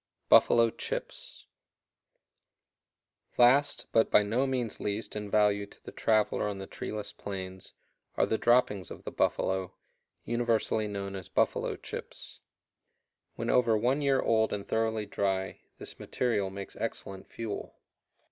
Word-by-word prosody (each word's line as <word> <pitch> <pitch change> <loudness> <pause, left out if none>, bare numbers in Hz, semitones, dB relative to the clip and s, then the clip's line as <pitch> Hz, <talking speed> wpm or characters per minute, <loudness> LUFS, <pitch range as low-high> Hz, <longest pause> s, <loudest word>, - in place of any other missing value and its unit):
Buffalo 115 -1 +6
chips. - - -6 1.9
Last, 130 +4 +4
but 115 - +3
by 105 - +5
no 120 +6 +1
means 125 -4 -2
least 105 +2 -3
in 105 -1 -4
value 100 -1 +2
to - - -20
the - - -9
traveler 110 -1 +1
on 100 -1 -3
the 95 - -6
treeless 105 +1 -6
plains, 95 -2 -7 0.4
are - - +4
the 110 - -1
droppings 120 -5 +3
of - - -10
the - - -6
buffalo, 95 -1 0 0.5
universally 115 -2 0
known 100 -1 -4
as 95 -3 -8
"buffalo - - +1
chips." - - -8 1.0
When - - -1
over 120 -3 +4
one 125 +6 +1
year 135 -2 +3
old 110 -1 +2
and 100 -1 -4
thoroughly 110 -1 0
dry, 95 -2 -2 0.2
this - - -9
material 110 -6 -1
makes 100 0 -8
excellent 95 -1 -5
fuel. 115 -3 -6
105 Hz, 135 wpm, -30 LUFS, 100-115 Hz, 1.9 s, Buffalo